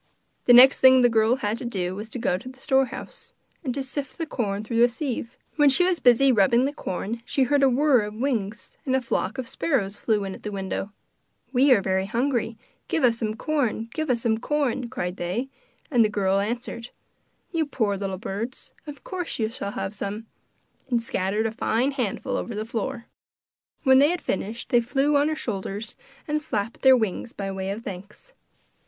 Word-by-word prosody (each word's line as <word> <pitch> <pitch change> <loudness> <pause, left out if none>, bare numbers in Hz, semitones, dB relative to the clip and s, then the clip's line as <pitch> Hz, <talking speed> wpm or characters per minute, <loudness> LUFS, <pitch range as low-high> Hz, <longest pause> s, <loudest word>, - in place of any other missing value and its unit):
The 245 - +7
next 255 +3 +9
thing 260 -1 +7
the 245 - +6
girl 225 +1 +3
had 220 -3 -2
to - - -6
do 185 -6 -2
was 210 +3 -7
to 250 - -5
go 225 - 0
to 195 +8 -7
the 260 - -14
storehouse, 270 - -2 0.3
and 265 - -2
to 275 - -2
sift 275 0 -6
the 330 - -2
corn 210 -8 -2
through 230 +2 0
a 240 - +6
sieve. 245 -2 -4 0.2
While 295 -2 +6
she 275 +7 +5
was 365 -2 +1
busy 255 +2 +5
rubbing 235 +3 +4
the 285 - -2
corn 225 - -4
she 270 - +1
heard 285 +2 +2
a 270 - +5
whirr 265 -1 +4
of 210 0 -7
wings, 230 -4 -3
and 260 -4 0
a 265 - +2
flock 235 0 -2
of 255 -2 -4
sparrows 210 -11 -1
flew 210 -1 0
in 195 -1 -4
at - - -11
the 210 - -5
window. 195 0 -4 0.6
'We 265 +2 +6
are 190 -3 +1
hungry; 235 0 -1 0.3
give 320 - -1
us 230 -2 +3
some 215 -2 -2
corn! 235 -5 -1
give 315 -2 -3
us 235 -2 +1
some 220 -2 +1
corn!' 265 -3 -1
cried 180 -6 -4
they; 195 +10 -3 0.4
and 240 -4 +5
the 215 - +2
girl 195 -2 +1
answered: 235 +2 -4 0.6
'You 325 -3 0
poor 220 -8 0
little 195 -1 -4
birds, 225 +4 -6
of 290 -2 -9
course 360 -2 -4
you 220 -2 0
shall 205 -4 -5
have 195 +1 -4
some!' 210 +2 -5 0.6
and 235 -2 +1
scattered 205 0 -1
a 225 - 0
fine 240 +3 0
handful 250 -8 -2
over 235 - -4
the 215 +1 -3
floor. 235 +2 -4 0.8
When 265 -2 +6
they 290 +2 +5
had 355 +1 -1
finished 215 +5 -4
they 240 - +4
flew 270 +5 +1
on 285 +1 +4
her 310 - -1
shoulders 210 -4 -5 0.3
and 300 0 -1
flapped 220 -6 -3
their 265 -1 +7
wings 220 0 -3
by 195 -1 -4
way 190 0 -4
of 210 +4 -4
thanks. 205 - -9
235 Hz, 200 wpm, -25 LUFS, 205-265 Hz, 0.8 s, next